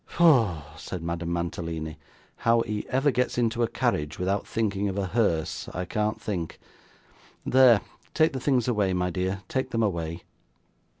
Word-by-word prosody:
'Foh!' 115 - +4
said 85 +1 -6
Madame 85 0 -3
Mantalini, 85 -2 -3 0.4
'how 115 0 +3
he 105 -2 -3
ever 135 +3 +2
gets 125 0 0
into 115 -1 +1
a 115 - +3
carriage 75 -6 -1
without 95 +3 -1
thinking 105 -3 0
of 95 - -4
a 100 - 0
hearse, 80 -7 0
I 90 +1 -2
can't 105 +2 -1
think. 90 -6 -4 0.9
There, 125 -5 +6 0.3
take 155 0 +4
the 130 - -2
things 130 -3 +1
away, 105 -6 +1
my 90 0 0
dear, 95 +2 -2
take 130 +3 -1
them 115 -2 0
away. 85 -4 -2
100 Hz, 160 wpm, -27 LUFS, 85-115 Hz, 0.9 s, There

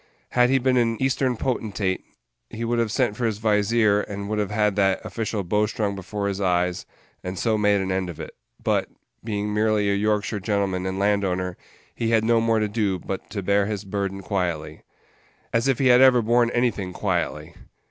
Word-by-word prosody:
Had 125 0 +3
he 135 - +4
been 130 0 +2
an 115 -2 +1
Eastern 130 -2 +1
potentate, 105 -7 -2 0.5
he 115 +1 -5
would 120 +1 0
have 115 -2 0
sent 120 -3 +1
for 120 +1 0
his 110 -2 -2
vizier, 105 0 +2
and 100 -1 -6
would 105 0 -1
have 105 - -1
had 105 -1 +1
that 95 -2 +2
official 110 -2 -3
bowstrung 105 +2 0
before 100 +2 -4
his 100 0 -3
eyes, 90 -1 0 0.4
and 90 +1 -5
so 110 +3 +1
made 105 -1 +3
an 95 0 -2
end 95 -1 -1
of 85 -2 -8
it; 80 - -8 0.2
but, - - 0 0.3
being 105 -1 -2
merely 105 -1 +2
a - - +2
Yorkshire 105 +1 0
gentleman 95 -2 -1
and 95 0 -3
land 100 0 +2
owner, 90 -1 -2 0.4
he 115 - -2
had 115 -1 +3
no 115 0 +3
more 115 0 +2
to 110 -1 +1
do 105 -3 0
but 95 +2 -6
to 100 -1 -4
bear 100 +1 +2
his 105 -1 -4
burden 100 0 -3
quietly. 85 -5 -3 0.7
As 115 +2 +2
if 135 -3 +2
he 130 -2 +3
had 125 +1 +7
ever 125 -3 +6
borne 120 +1 +3
anything 120 -7 -1
quietly! - - -2
105 Hz, 200 wpm, -24 LUFS, 95-115 Hz, 0.7 s, had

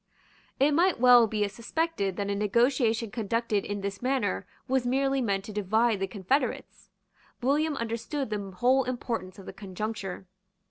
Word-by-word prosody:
It 280 +3 +4
might 345 +2 +3
well 245 -2 +7
be 210 -1 0
suspected 225 - -2
that 200 +1 -2
a - - +1
negotiation 230 +2 +1
conducted 225 -1 -1
in 205 0 -4
this 200 0 -4
manner 250 - -1 0.2
was 265 -1 +1
merely 270 +2 +1
meant 200 -5 0
to 215 - -8
divide 215 +2 +1
the 195 - -1
confederates. 220 +8 -2 0.5
William 295 +3 +1
understood 230 +3 -3
the 210 - -1
whole 250 +8 +2
importance 235 -6 -4
of 195 - -11
the - - -8
conjuncture. 195 -1 -5
230 Hz, 150 wpm, -28 LUFS, 200-260 Hz, 0.5 s, well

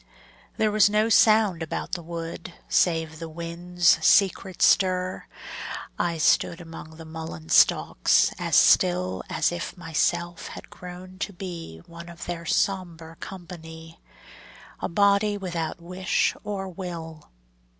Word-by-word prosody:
There 215 -1 +2
was 210 -1 +5
no 215 +2 +2
sound 215 -5 +4
about 160 - -4
the 175 - -3
wood 170 +1 -7
Save 160 -2 +1
the 165 -1 -6
wind's 170 0 +1
secret 190 -1 +3
stir. 185 -1 +2 0.7
I 170 -1 0
stood 165 +2 +2
Among 165 -2 -10
the 165 - -10
mullein 160 - -8
stalks - - +4
as - - 0
still 90 +1 +4
As - - +1
if 85 - -5
myself 175 +1 -1
had - - -10
grown 180 +1 -10
to 205 - -3
be 170 - -8
One 170 0 -11
of 170 0 -9
their 170 -1 -5
sombre 170 -5 -1
company, 165 -3 -10 0.8
A - - -3
body 200 +3 +3
without 170 -4 -4
wish 180 +2 0
or 200 -2 -4
will. 165 -4 -8
170 Hz, 130 wpm, -25 LUFS, 165-185 Hz, 0.8 s, was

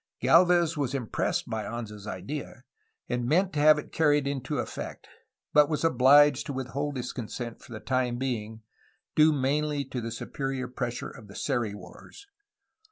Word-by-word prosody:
Galvez 170 -1 +4
was 140 -3 -1
impressed 125 -5 -1
by 110 -1 -3
Anza's 105 -3 -7
idea, 120 +7 -6 0.4
and 120 0 -1
meant 180 +7 +2
to 150 - -1
have 155 +1 +7
it - - -7
carried 145 -3 +3
into 140 -2 -3
effect, - - -5 0.5
but 150 0 +6
was 150 -1 -1
obliged 145 -1 +5
to 140 - -3
with 130 -1 -4
hold 145 +1 -3
his 125 0 -4
consent 120 -1 -6
for - - -15
the 110 - -6
time 125 0 -1
being, 110 -4 -4 0.5
due 155 +1 +6
mainly 145 +1 0
to 130 -1 -5
the 115 - -4
superior 135 +3 -4
pressure 125 -1 -4
of 115 -5 -13
the 100 - -13
Seri 120 -7 -1
wars. 405 - -13
130 Hz, 165 wpm, -28 LUFS, 120-145 Hz, 0.5 s, have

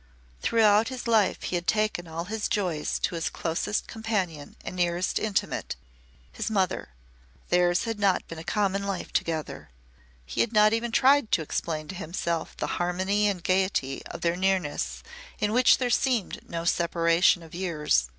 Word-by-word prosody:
Throughout 220 -1 +4
his 255 -2 -5
life 220 -4 +2
he - - -4
had 175 0 -3
taken 215 -5 0
all 165 +1 -4
his 215 +2 -2
joys 175 -7 -1
to - - +1
his 165 -1 -1
closest 175 +5 -2
companion 195 -10 -3
and - - -5
nearest 175 0 0
intimate 215 -3 -2 0.6
his - - -3
mother. 190 - 0 0.6
Theirs 175 +1 +3
had 225 -2 -3
not 195 -3 +2
been 165 - -7
a - - -7
common 200 +1 0
life 200 -1 -4
together. 160 - -2 0.6
He 65 - -1
had 235 - 0
not 215 0 +5
even 230 +1 -1
tried 265 0 +4
to 160 - +3
explain 155 0 -3
to - - -4
himself 170 -2 -3
the - - -2 0.2
harmony 190 +4 +1
and 190 -4 -2
gaiety 185 -8 0
of - - -8
their 170 0 +1
nearness 185 -5 -1 0.3
in 210 0 0
which 250 +1 +6
there 250 -2 -1
seemed 245 -5 0
no 165 0 -4
separation 170 0 +3
of 160 - -14
years. 150 - 0
185 Hz, 165 wpm, -27 LUFS, 170-210 Hz, 0.6 s, which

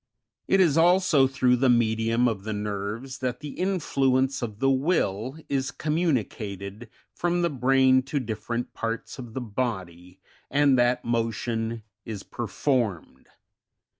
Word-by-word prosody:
75 - - +1
It 190 - +7
is 150 0 0
also 175 -5 +5
through 130 -1 +2
the 130 +1 +3
medium 115 0 +2
of 105 -5 -2
the 110 +1 -3
nerves 105 +5 -4
that 125 -1 -2
the 150 - -6
influence 135 -8 0
of 110 -4 -4
the 135 +4 +2
Will 130 - 0
is 135 -1 -1
communicated 115 - -2 0.2
from 175 0 0
the 170 - +1
brain 130 0 +4
to 140 +2 -2
different 115 0 -4
parts 115 +3 -4
of 120 -3 -9
the 130 - -2
body, 95 -6 -4 0.3
and 145 -1 +4
that 120 +1 +2
motion 115 -1 -2 0.2
is 105 -3 -6
performed. 115 - -2
125 Hz, 135 wpm, -26 LUFS, 110-135 Hz, 0.3 s, It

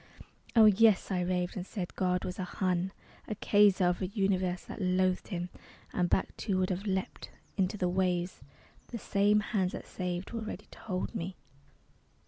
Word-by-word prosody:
Oh, 225 -2 +8
yes, 215 -1 +5
I 185 -1 +1
raved, 180 0 -1
and 185 - -3
said 185 -2 -5
God 180 -1 0
was 180 - -5
a - - -1
Hun, 180 0 -1 0.4
A 215 - -3
Kaiser 205 -2 +4
of 175 +1 +1
a 185 - 0
Universe 185 -3 0
that - - -7
loathed 185 0 +1
him. 175 -3 -3 0.4
And 180 -1 +1
back, - - +1
too, 195 -3 -1
would 185 0 +1
have 190 +3 -3
leapt, 190 -1 -2 0.3
into 195 +1 0
the 180 - +1
waves, 180 -1 0 0.4
But - - -25
the - - -1
same 205 0 +3
hands 190 -4 0
that - - -6
saved 180 0 -4
were 230 -1 -3
ready 215 - -6
to - - -13
hold 185 -4 -3
me. 180 +2 -4
185 Hz, 185 wpm, -31 LUFS, 180-200 Hz, 0.4 s, Oh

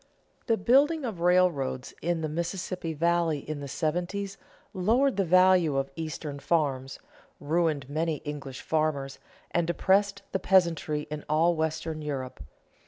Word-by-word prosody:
The 225 -2 +3
building 280 - +3
of 215 -8 -4
railroads 170 -7 +2
in 170 -1 -1
the 155 - -1
Mississippi 170 +1 -3
valley 170 0 +2
in 155 -1 -4
the 140 - -6
seventies 180 +7 -2 0.4
lowered 235 +9 +2
the 195 - +2
value 185 -4 +4
of 135 0 -1
Eastern 155 -2 -5
farms, 140 -3 0 0.4
ruined 155 -2 0
many 155 +2 -1
English 140 -3 -6
farmers, 155 -4 -1 0.3
and 170 -1 +1
depressed 200 +3 +2
the 190 - 0
peasantry 170 -5 +2
in 150 -1 -5
all 165 +3 +3
western 160 0 -2
Europe. 135 - -5
165 Hz, 135 wpm, -28 LUFS, 150-185 Hz, 0.4 s, value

